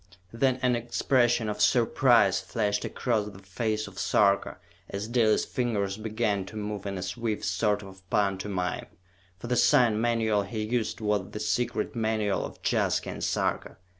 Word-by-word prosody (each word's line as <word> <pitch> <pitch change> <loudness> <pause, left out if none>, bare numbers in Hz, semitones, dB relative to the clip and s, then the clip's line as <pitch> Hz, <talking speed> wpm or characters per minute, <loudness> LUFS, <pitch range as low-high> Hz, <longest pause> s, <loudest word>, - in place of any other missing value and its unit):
Then 130 +2 +2
an 125 -1 +3
expression 120 0 +1
of 105 0 -3
surprise 120 -3 +4
flashed 105 -2 -1
across 110 -4 -1
the 100 - -13
face 110 +3 -2
of 100 -1 -10
Sarka 100 -2 +2 0.3
as 100 +2 -4
Dalis' 115 -2 +2
fingers 105 -6 -1
began 110 -2 -1
to 110 - -10
move 105 -1 -4
in 100 -1 -3
a 90 - -4
swift 110 +3 -3
sort 105 -2 0
of 95 -1 -12
pantomime 95 -2 -1 0.5
for 95 - -10
the 125 +1 0
sign 120 -2 +4
manual 115 -3 +1
he 110 +2 -4
used 115 0 -2
was 105 -3 0
the 105 - -6
secret 120 +4 -1
manual 110 -3 0
of - - -7
Jaska - - +1
and - - -6
Sarka! - - -1
110 Hz, 160 wpm, -27 LUFS, 100-120 Hz, 0.5 s, surprise